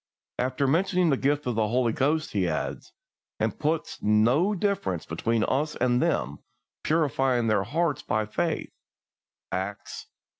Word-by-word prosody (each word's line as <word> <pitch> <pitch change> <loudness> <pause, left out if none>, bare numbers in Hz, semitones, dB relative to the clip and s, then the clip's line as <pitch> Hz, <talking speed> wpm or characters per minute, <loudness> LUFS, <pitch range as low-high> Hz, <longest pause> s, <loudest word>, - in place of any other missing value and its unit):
After 130 +2 0
mentioning 175 +3 +2
the - - +4
gift 145 +3 0
of 125 - 0
the 110 -1 +1
Holy 120 0 +1
Ghost, 155 +5 0
he 95 -3 0
adds, 80 - -3 0.5
"and 110 -1 -1
put 155 +1 -1
no 120 - +3
difference 175 - -1
between 110 +7 0
us 150 +6 0
and 125 0 +2
them, 70 - 0 0.4
purifying 135 -6 +1
their 110 -3 +2
hearts 160 +4 0
by 110 0 -1
faith" 160 +9 -2 0.8
(Acts 95 +2 -5
xv. - - -41
130 Hz, 145 wpm, -26 LUFS, 110-155 Hz, 0.8 s, the